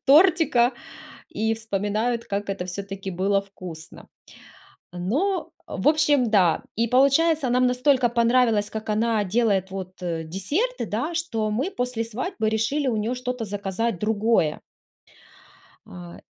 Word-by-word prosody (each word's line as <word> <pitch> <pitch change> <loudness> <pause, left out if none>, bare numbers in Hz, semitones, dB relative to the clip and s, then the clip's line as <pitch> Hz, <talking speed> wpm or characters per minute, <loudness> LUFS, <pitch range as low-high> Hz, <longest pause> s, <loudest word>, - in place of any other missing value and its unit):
тортика 305 -5 +5 0.6
и 220 +1 -1
вспоминают, 220 +2 -2
как 200 0 -3
это 195 -2 -3
всё-таки 195 +1 -6
было 195 +3 +1
вкусно. 180 -5 -10 0.8
Но, 275 - -1 0.2
в - - 0
общем, 295 -6 +3
да. 185 -6 +3
И 230 - +2
получается, 275 +2 +3
нам 250 +1 +3
настолько 250 0 +3
понравилось, 235 -3 +2
как 220 0 -6
она 220 0 +1
делает 195 -2 +1
вот, 185 -1 -6
э, 165 -2 -2
десерты, 295 - -1
да, 340 - -3
что 225 -11 -1
мы 260 - -1
после 245 - -2
свадьбы 230 - -3
решили 225 +7 0
у 230 - 0
нее 220 +4 -1
что-то 250 -2 -4
заказать 200 +1 -2
другое. 215 -6 +1 1.3
А. 90 0 -11
225 Hz, 130 wpm, -24 LUFS, 195-255 Hz, 1.3 s, тортика